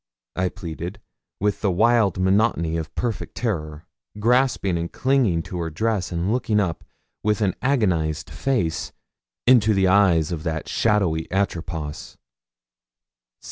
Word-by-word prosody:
I 90 0 0
pleaded, 90 +2 -7 0.4
with 105 0 0
the 100 - +2
wild 110 0 +3
monotony 95 -3 +2
of 80 -1 -5
perfect 120 -4 -3
terror, 80 -10 -3 0.3
grasping 120 -4 +2
and 85 0 -3
clinging 125 -11 +1
to 90 - -6
her 85 -1 -2
dress, 100 +2 -1
and 85 +3 -1
looking 115 -4 +1
up, 90 -5 -1 0.4
with 105 0 +1
an 95 -3 +2
agonised 90 - 0
face, 110 -13 -1 0.5
into 110 -4 +5
the 95 -1 +3
eyes 90 -5 +4
of 85 -3 -3
that 80 -1 -3
shadowy 95 -8 +1
Atropos. 85 -6 -3
95 Hz, 130 wpm, -23 LUFS, 85-110 Hz, 0.5 s, into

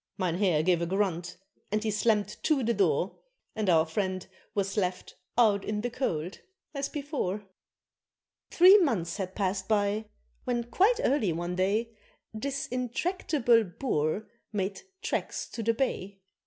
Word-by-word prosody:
Mynheer 180 -3 +1
gave 175 0 +3
a 170 - 0
grunt, 180 -2 -1 0.3
and 215 +1 0
he 220 - 0
slammed 210 0 +1
to 295 -5 +2
the 235 +1 +2
door, 185 -2 +1 0.4
And 215 -3 0
our 160 -2 +5
friend 185 +2 -2 0.3
was 195 -1 -1
"left 180 -3 -2 0.2
out 210 -4 +4
in 210 0 -2
the 245 +2 -2
cold" 180 - -2 0.3
as 280 -1 -2
before. 275 - -3 1.1
Three 375 +4 +8
months 200 - 0
had 190 -2 -4
passed 190 -1 -1
by 210 0 +1 0.4
when 240 -1 -1
quite 390 - +3
early 255 - +2
one 175 +2 -3
day 215 +5 0 0.4
This 275 +5 -3
intractable 250 -1 +1
Boer 180 - -1 0.2
made 195 -2 -2 0.2
tracks - - -2
to 230 - -5
the 230 +1 +1
Bay. 200 -6 -2
210 Hz, 140 wpm, -29 LUFS, 185-240 Hz, 1.1 s, Three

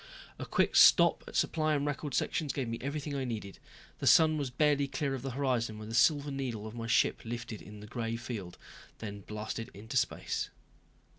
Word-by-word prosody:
A - - -5
quick - - +1
stop - - +7
at - - -9
supply 155 -1 +1
and 145 0 0
record 145 -1 -3
sections 150 -4 0
gave 135 -4 -2
me 115 0 -4
everything 145 +2 -3
I 135 - -1
needed. 110 -6 -5 0.4
The - - -1
sun 160 -1 +6
was 140 -3 -2
barely 145 +1 +2
clear 135 0 -2
of 130 - -4
the 135 - -4
horizon 120 -6 0
when 110 0 -8
the - - -6
silver 145 +4 +3
needle 125 -6 -4
of 110 - -7
my 115 -1 -5
ship 120 - +2
lifted 115 -2 -6
in 105 0 -11
the - - -9
gray 115 0 -3
field, 115 -7 -6 0.4
then 100 -2 -6
blasted 105 +2 -5
into 110 +6 -4
space. - - -1
120 Hz, 200 wpm, -31 LUFS, 110-140 Hz, 0.4 s, stop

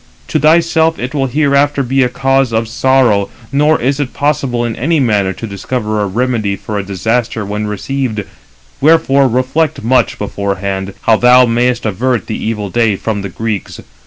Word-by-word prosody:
To - - +1
thyself 160 0 +3
it 125 +2 -5
will 135 -2 0
hereafter 145 0 +1
be 135 +2 +1
a 125 - +2
cause 135 0 +1
of 115 0 0
sorrow, 120 -4 +2 0.2
nor 150 +3 +2
is 135 +3 0
it 140 -3 -3
possible 140 -5 0
in 115 -1 -3
any 160 +5 0
manner 105 -7 +1
to 115 - -7
discover 105 +1 -3
a 100 - 0
remedy 110 -1 -1
for 105 +1 -5
a - - -3
disaster 110 +3 -2
when 105 +1 -3
received; 110 +1 -3 0.6
wherefore 140 -3 +4
reflect 130 +5 0
much 125 +1 +2
beforehand, 100 -1 -3
how 110 -1 +3
thou 125 +2 +6
mayest 120 +1 0
avert 115 +2 -1
the 110 - -4
evil 105 -3 -3
day 115 -4 +2
from 105 +1 -3
the 100 - -5
Greeks. 110 +1 -4
120 Hz, 170 wpm, -14 LUFS, 105-135 Hz, 0.6 s, thou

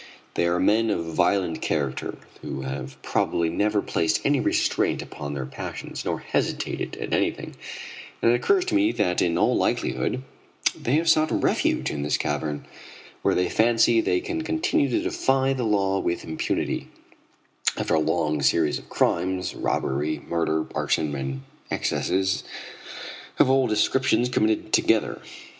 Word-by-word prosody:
They 85 - +1
are 85 +1 +1
men 110 +3 +3
of 85 -4 -2
violent 90 -1 +1
character 70 -4 -2 0.2
who - - -5
have 65 0 -6
probably 85 -1 +1
never 105 +4 +1
placed 80 -1 0
any - - +3
restraint - - +1
upon 70 0 -6
their 65 -2 -3
passions, 65 - -6
nor - - -2
hesitated - - -2
at - - -4
anything, - - -1 0.6
and 115 - +4
it - - +4
occurs 365 - +2
to 365 - -3
me 315 +1 +4
that 90 -2 +1
in 85 -1 +1
all - - +3
likelihood 130 - 0 0.5
they 125 - 0
have 165 +2 +1
sought 155 -1 +4
refuge - - +1
in 75 - -3
this 75 0 +1
cavern, 75 0 -2 0.6
where - - +2
they 90 0 +2
fancy 115 - +4
they 380 +1 +1
can 350 -4 -3
continue 320 -1 +1
to 330 - 0
defy 135 - +1
the 130 -3 -2
law 95 -2 +2
with 85 -2 -2
impunity, 80 0 -2 0.9
after - - -1
a 80 - +4
long 75 -1 0
series 75 +1 +2
of - - -17
crimes 95 0 0
robbery, 75 +3 -1
murder, 80 -2 0
arson, 75 -2 0
and 65 -1 -4 0.3
excesses 95 +1 0 0.9
of 130 - +5
all 135 -1 +4
descriptions 120 +2 +2
committed 110 -3 0
together. 110 -1 +2
95 Hz, 150 wpm, -25 LUFS, 80-130 Hz, 0.9 s, of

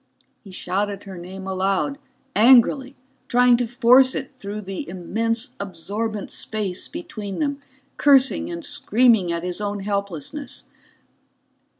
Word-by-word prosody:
_" - - -42 0.4
He 200 - -13
shouted 200 +2 -3
her 195 -2 -9
name 185 +2 -8
aloud, 195 +8 -1 0.4
angrily, 260 +4 +5 0.3
trying 245 0 +5
to 245 -1 -1
force 255 +2 +5
it 265 - -4
through 205 0 -5
the 195 -3 -6
immense 225 +6 -2
absorbent 200 +3 -4
space 205 -4 -4
between 215 - -7
them, 285 -2 -1 0.4
cursing 270 -2 +4
and 170 -1 -6
screaming 225 -6 +3
at 170 0 -3
his 180 +2 -2
own 205 -1 -3
helplessness. 200 - -4
210 Hz, 125 wpm, -22 LUFS, 190-250 Hz, 0.4 s, angrily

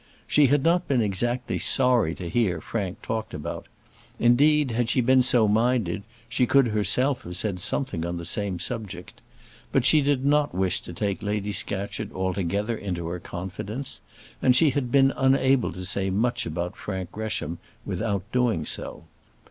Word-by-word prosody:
She 150 -2 +4
had 140 +1 +2
not 175 +2 +2
been 130 -5 +2
exactly 120 +5 -1
sorry 125 -10 +3
to 90 - -6
hear 90 -3 0
Frank 100 +4 -4
talked 110 -2 -4
about; - - -6 0.5
indeed, 145 +3 +4
had 115 0 0
she 120 - +2
been 130 +1 +4
so 125 -3 +4
minded, 110 -3 +1 0.3
she 125 +1 +1
could 135 -2 +4
herself 110 +6 +2
have 90 +1 -7
said 95 -2 -1
something 110 - -1
on 85 +1 -3
the 85 - -6
same 100 +1 -1
subject; 100 -3 -5 0.5
but 135 -2 +2
she 155 +2 +6
did 140 -1 0
not 145 -5 +2
wish 95 0 0
to 90 - -9
take 100 +3 -2
Lady 105 0 -2
Scatcherd 100 +1 -3
altogether 95 +4 -1
into 90 -5 -4
her 90 +1 -4
confidence, 95 +9 -6 0.4
and 125 - +4
she 150 +2 +5
had 125 -2 -2
been 135 -1 +4
unable 135 -1 +2
to 90 +2 -6
say 95 +1 0
much 120 +4 0
about 90 0 -4
Frank 95 -3 -5
Gresham 95 -7 -4 0.3
without 100 -4 -2
doing 120 -11 +1
so. - - -5
110 Hz, 165 wpm, -25 LUFS, 95-130 Hz, 0.5 s, she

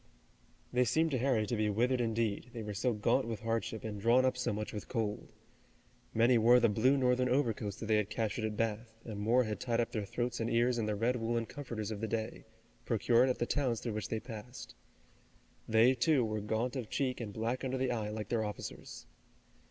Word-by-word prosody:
They 125 +1 +4
seemed 160 +6 +2
to 130 - 0
Harry 125 -4 +2
to 110 - -2
be 105 -1 +1
withered 125 +4 +1
indeed, 115 0 -1
they 115 -2 -5
were 105 0 -5
so 120 +5 0
gaunt 105 0 +1
with 110 -3 -4
hardship 115 -1 -2
and 105 -2 -5
drawn 120 +4 +4
up 130 - +2
so 125 - -1
much 105 +1 -4
with 105 - -6
cold. 110 -4 -3 0.8
Many 115 +1 +4
wore 120 +3 +6
the 115 -1 +4
blue 125 +7 +3
Northern 125 -1 +2
overcoats 115 -6 0
that - - -7
they 110 0 +3
had 105 -1 0
captured 110 0 -2
at 105 -1 -3
Bath, 110 0 -2
and 110 -3 -6
more 115 +5 +3
had 105 -4 -4
tied 115 0 -1
up 120 - 0
their 110 - -2
throats 120 +2 -2
and 115 - -1
ears 120 +1 +2
in 110 - -1
the 105 - 0
red 120 +4 +1
woolen 115 0 -1
comforters 115 -4 -5
of 105 -1 -5
the 110 - -1
day, 110 0 -4 0.4
procured 120 +2 +3
at 125 - 0
the 120 - 0
towns 125 -4 0
through 115 - -4
which 110 - -4
they 110 - -1
passed. 120 +1 -9 1.0
They, 115 +3 +5
too, 130 0 +2
were 110 -1 -2
gaunt 110 +5 -1
of 125 -5 -4
cheek 130 -3 -1
and 110 -3 -5
black 115 +5 -2
under 130 0 -1
the 130 -1 0
eye 110 -3 -2
like 105 -1 -5
their 115 -2 +1
officers. 105 -1 -7
115 Hz, 220 wpm, -33 LUFS, 110-125 Hz, 1.0 s, wore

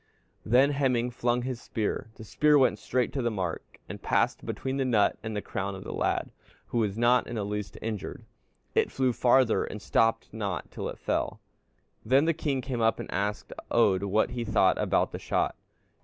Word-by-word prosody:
"Then 130 +5 +4
Hemingr 125 -4 +1
flung 120 0 0
his 125 -2 -4
spear. 110 0 -3
The - - -10
spear 150 +7 +3
went 135 - +3
straight 125 -1 -1
to 135 - -1
the 120 - +1
mark, 95 -6 -4
and - - -8
passed - - +1
between 130 0 -3
the 135 - +1
nut 115 -6 +3
and 110 -1 -5
the 105 - -3
crown 100 0 -3
of 95 - -8
the - - -6
lad, - - -1 0.4
who 120 - 0
was 105 -2 0
not 120 +1 +3
in 120 - -5
the 105 -3 -2
least 105 0 -4
injured. 110 -3 -5 0.5
It - - +2
flew 130 -2 +1
farther, 125 -1 +3
and 105 - -6
stopped 115 +2 +1
not 100 -4 -4
till - - -4
it - - -7
fell. - - -2 0.6
"Then 135 +6 +4
the 165 - +3
king 140 -4 -1
came 125 -2 -3
up 115 0 +2
and - - -6
asked 100 +2 -2 0.2
Oddr 100 -4 +3
what 100 +2 +1
he 120 -1 -3
thought 100 -4 +3
about - - +1
the - - -6
shot." - - 0
115 Hz, 200 wpm, -28 LUFS, 105-130 Hz, 0.6 s, Then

